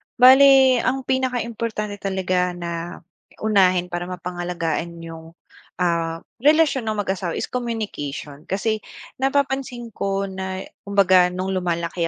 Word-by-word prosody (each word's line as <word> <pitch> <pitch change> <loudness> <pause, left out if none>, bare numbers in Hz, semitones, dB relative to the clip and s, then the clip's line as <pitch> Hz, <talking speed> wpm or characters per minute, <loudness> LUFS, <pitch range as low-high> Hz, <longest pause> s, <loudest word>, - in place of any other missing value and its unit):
Bale 265 0 +7
ang 265 +1 0
pinaka 260 -2 0
importante 215 -3 -4
talaga 185 -2 -1
na 170 0 -6 0.4
unahin 185 -4 +3
para 175 0 -3
mapangalagaan 175 -2 -4
yung, 165 0 -10 0.4
ah, 165 -2 -1 0.2
relasyon 295 -4 +3
ng 215 -1 -1
mag-asawa 190 -3 -2
is - - -2
communication, 200 - -5
kasi 215 +3 -1 0.4
napapansin 270 -3 -1
ko 195 0 -1
na 190 -1 -5 0.2
kumbaga 185 -3 +5
no'ng 185 +2 -3
lumalaki 170 0 -1
190 Hz, 115 wpm, -22 LUFS, 175-235 Hz, 0.4 s, Bale